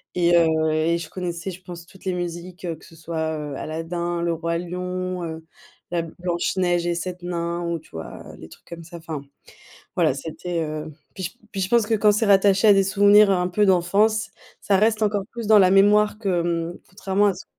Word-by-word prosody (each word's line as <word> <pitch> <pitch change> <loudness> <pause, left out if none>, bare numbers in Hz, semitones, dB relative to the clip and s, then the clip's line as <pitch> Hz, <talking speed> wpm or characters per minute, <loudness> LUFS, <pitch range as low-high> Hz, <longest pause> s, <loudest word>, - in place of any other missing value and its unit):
et 175 -1 +3
heu 160 -2 +3
et 160 +2 +1
je 165 -2 -6
connaissais, 180 0 -5
je 180 - -11
pense, 175 -2 -10
toutes 190 +2 -18
les 185 - 0
musiques, 175 +1 -6 0.2
que - - -20
ce 165 - -15
soit, 160 -1 -3
heu, 150 -2 -5
Aladin, 170 +2 -3
Le 170 - +1
Roi 170 +1 -2
Lion, 180 +1 -4
heu, 160 -1 -6 0.5
la 170 -1 0
Blanche 175 +1 -3
Neige 175 -1 +1
et 170 - 0
7 180 +1 -5
Nains 170 -1 -3
ou, 170 -1 -2
tu 160 - -18
vois? 80 0 -8 0.2
Les 80 - -11
trucs - - -17
comme 170 -1 -9
ça, 170 +1 -10
enfin. 160 -3 -6 0.8
Voilà, - - +3
c'était, 165 +4 -4
heu, 155 0 -5 0.2
puis 190 - -5
je - - -2 0.2
puis 195 - -4
je 185 - -1
pense 235 -1 +3
que 220 - +1
quand 210 0 +4
c'est 210 +1 +1
rattaché 195 +1 +5
à 205 - +9
des 195 -1 +4
souvenirs 205 +1 +5
un 180 -1 +1
peu 205 +3 +2
d'enfance, 200 +4 +2 0.3
ça 195 - +2
reste 220 +2 +2
encore 205 -2 +1
plus 230 -2 -5
dans 215 - +7
la 185 -1 +5
mémoire 210 +2 +4
que, 170 -4 -1
mmh, - - -13
contrairement 195 +2 0
à 195 - +2
ce 185 - -11
175 Hz, 215 wpm, -23 LUFS, 170-195 Hz, 0.8 s, à